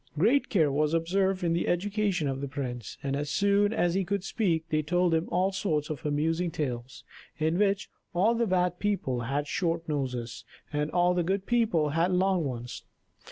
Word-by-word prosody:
Great 230 - +3
care 160 -8 +3
was 150 +3 +1
observed 190 +3 +1
in 170 -1 +2
the 170 - 0
education 195 -2 0
of 135 0 -2
the 140 - -3
prince; 125 -6 -5
and 140 0 -1
as 145 +1 -2
soon 200 +2 +3
as 175 -6 +1
he 195 +1 +1
could 200 +1 -2
speak 170 -6 0
they 155 0 +1
told 175 +2 +1
him 160 +1 0
all 185 +3 +1
sorts 165 -7 -1
of 155 +1 -6
amusing 160 +4 0
tales, 130 -6 -4 0.3
in 160 +3 0
which 200 -1 +2 0.2
all 195 +7 +3
the 235 0 +1
bad 180 -2 +1
people 195 -12 -1
had 135 +5 -1
short 165 +1 -1
noses, 125 -5 -3 0.3
and 150 +1 0
all 175 +1 +3
the 180 - +1
good 190 +3 -1
people 225 -11 +2
had 165 +5 +1
long 185 -1 +2
ones. 125 -3 -5
170 Hz, 190 wpm, -28 LUFS, 145-190 Hz, 0.3 s, Great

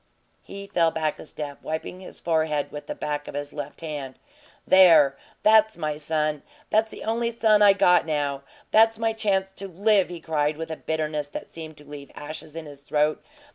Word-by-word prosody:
He 200 0 -9
fell 170 -4 +2
back 160 -1 -2
a - - -10
step, 145 -2 -7
wiping 160 +3 -5
his 185 - -11
forhead 155 -3 0
with 150 - -8
the - - -4
back 145 0 -4
of - - -8
his 145 0 -5
left 145 +1 -7
hand. 145 -5 -6 0.5
"There! 165 -7 +6 0.3
That's 220 -1 +5
my 155 -2 -2
son! 155 -1 -1 0.3
That's 220 +1 +3
the - - -9
only 230 +1 0
son 220 -2 +3
I 205 -1 +8
got 180 -3 +4
now! 145 -3 -1 0.3
That's 225 0 +5
my 225 0 0
chance 195 -3 0
to 195 0 -8
live," 195 +1 +2
he 175 -1 -7
cried, 150 -2 -1
with 160 0 -5
a - - -3
bitterness 155 -2 -3
that - - -8
seemed 160 -2 -9
to 150 - -15
leave 145 -1 -10
ashes 155 +1 -8
in 165 -1 -6
his 145 -1 -12
throat. 150 +1 0
160 Hz, 195 wpm, -25 LUFS, 150-195 Hz, 0.5 s, I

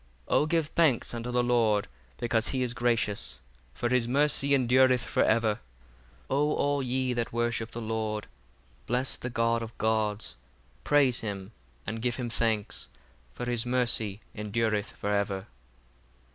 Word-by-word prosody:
67 - - -3
O - - +2
give 165 -1 +1
thanks 155 -11 +2
unto 120 +1 -4
the 125 0 +1
Lord, 115 -4 +2 0.3
because 115 -2 +1
he 130 -2 0
is 120 -1 -2
gracious: 105 - 0 0.4
for 120 - -1
his 125 -2 +2
mercy 140 +1 +3
endureth 130 -1 +4
for - - 0
ever. 110 -1 +2 0.6
68 - - -29
O 145 +2 +2
all 145 0 +1
ye 130 0 0
that 120 -1 -2
worship 115 -1 -1
the 120 - -6
Lord 110 -1 -2 0.6
bless 125 +3 0
the 125 - -5
God 115 -1 +1
of 115 0 -7
gods, 110 -1 0 0.5
praise 140 -4 +4
him, 100 -2 -5 0.3
and 110 0 -4
give 120 0 0
him 120 -2 -3
thanks: 110 -3 0 0.5
for 125 - -4
his 120 -2 0
mercy 115 -4 0
endureth 105 -1 -1
for 105 0 -2
ever. 100 -1 -1
120 Hz, 155 wpm, -29 LUFS, 110-125 Hz, 0.6 s, endureth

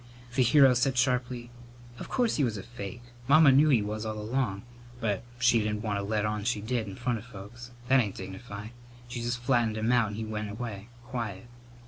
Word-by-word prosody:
The 130 - +2
hero 135 +1 +6
said 125 +1 +1
sharply: 125 -1 0 0.5
"Of - - -7
course 245 -3 +1
he 150 - +2
was 115 -5 0
a 95 - -6
fake! 120 0 -8 0.2
Mamma 145 0 +7
knew 145 +4 +5
he 120 -7 +4
was, 105 +1 -4
all 110 -1 -4
along, 105 -2 -2 0.4
but 105 -5 -1 0.2
she 120 0 +4
didn't 105 -1 -2
want 105 -2 -1
to - - -3
let 105 +1 0
on 105 -1 -2
she 115 -1 0
did 110 +1 -2
in 100 - -7
front 120 0 -1
of 105 - -12
folks. 120 +1 -10 0.2
That 135 +1 +5
ain't 105 -6 0
dignified. 100 +3 -8 0.4
She 120 0 -5
just 120 +1 -1
flattened 120 -3 +1
him 110 +2 +1
out 120 -3 +4
and 105 - -5
he 110 +1 -4
went 110 -1 -4
away 105 -1 -6 0.2
quiet. 115 -6 -5
115 Hz, 210 wpm, -29 LUFS, 105-125 Hz, 0.5 s, Mamma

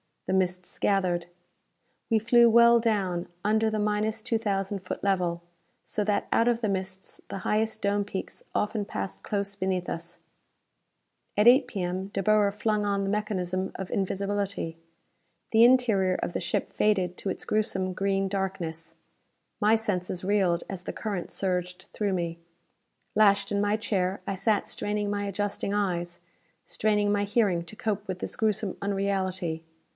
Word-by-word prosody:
The - - -1
mists 180 -1 -1
gathered. 180 -4 +1 0.8
We 225 - +4
flew 235 +2 +5
well 235 +1 +7
down 195 -6 0 0.2
under 220 +1 +2
the 215 - -1
minus 210 +1 0
two 230 0 0
thousand 200 -2 -1
foot 185 - -6
level 180 -3 0 0.4
so 210 - -1
that 205 -1 0
out 230 - +3
of 240 -1 +2
the 215 - 0
mists 190 -1 -4
the 195 - -5
highest 220 +3 0
dome 205 0 +1
peaks 195 -1 -5
often 210 0 0
passed 95 - -5
close 200 -1 -2
beneath 190 -2 -1
us. 170 +1 -5 1.2
At 210 +3 +8
8 260 +1 +5
P.M. 190 -4 -3
De 195 -1 -3
Boer 210 0 +4
flung 210 0 0
on 200 -1 0
the 195 - -1
mechanism 190 -3 -1
of 190 - -6
invisibility. 195 -3 -1 0.7
The 225 +1 +7
interior 225 -7 +4
of - - -2
the - - -2
ship 175 - -2
faded 185 -4 +1
to 195 - -3
its - - -4
gruesome 190 -3 0
green 195 +1 0
darkness. 170 -4 -3 0.6
My 215 +2 +5
senses 185 -5 -2
reeled 185 -3 +2
as 190 -2 -6
the - - -5
current 200 -5 -4
surged 180 -1 -2
through 205 -2 0
me. 170 -2 -2 0.8
Lashed 200 -1 +4
in 200 - +1
my 205 +1 +2
chair, 195 -3 -1
I - - -2
sat 200 +2 +1
straining 205 0 -2
my 205 0 -1
adjusting 200 0 -2
eyes, 175 -4 -1 0.5
straining 210 -1 +1
my 205 0 +1
hearing 200 -5 +2
to 195 - -11
cope 210 -1 -2
with 185 -1 -4
this - - -5
gruesome 215 -3 0
unreality. 190 -4 -1
200 Hz, 160 wpm, -27 LUFS, 185-210 Hz, 1.2 s, At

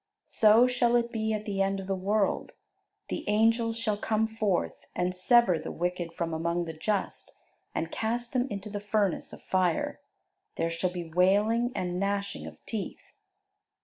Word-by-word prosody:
So 220 +2 +5
shall 245 -1 +2
it 235 0 +2
be 220 -1 -1
at 215 -1 -2
the 200 -2 -1
end 195 0 +1
of 190 - -6
the 195 - -1
world: 200 +2 0 0.6
the - - -3
angels 225 +2 +3
shall 215 -2 0
come 220 +1 +1
forth, 215 -5 -1
and 180 +1 0
sever 185 -2 +4
the - - -6
wicked 175 0 -2
from 165 -1 -3
among 170 +2 -1
the 160 - -5
just, 200 +5 -2 0.5
and - - -2
cast 235 +2 -2
them 255 0 +1
into 200 -1 -5
the 205 - -3
furnace 205 -3 0
of - - -11
fire. 185 -3 0 0.6
There 165 0 -1
shall 165 +2 0
be 175 -3 -7
wailing 210 +7 +3
and 180 0 -2
gnashing 200 0 -2
of - - -10
teeth." 215 -3 -6
200 Hz, 170 wpm, -29 LUFS, 180-225 Hz, 0.6 s, So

